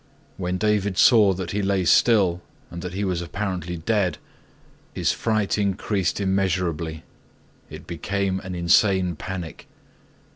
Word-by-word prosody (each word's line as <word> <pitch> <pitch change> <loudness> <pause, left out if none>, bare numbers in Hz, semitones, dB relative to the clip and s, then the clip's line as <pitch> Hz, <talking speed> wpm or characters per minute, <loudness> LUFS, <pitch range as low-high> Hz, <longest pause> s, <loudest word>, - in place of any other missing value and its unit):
When 90 0 -2
David 105 -2 0
saw 105 -5 +6
that 90 -1 -5
he 105 - -1
lay 95 -2 0
still 95 -3 +4 0.3
and 85 - -7
that 90 0 -6
he 100 - -2
was 90 -2 -1
apparently 90 -1 -4
dead, 95 +2 0 0.8
his - - +1
fright 110 -2 0
increased 100 -1 -1
immeasurably. 90 -5 -1 0.7
It - - -10
became 95 +3 -2
an 95 -2 -7
insane 90 +1 +3
panic. 90 0 -7
95 Hz, 125 wpm, -23 LUFS, 90-100 Hz, 0.8 s, saw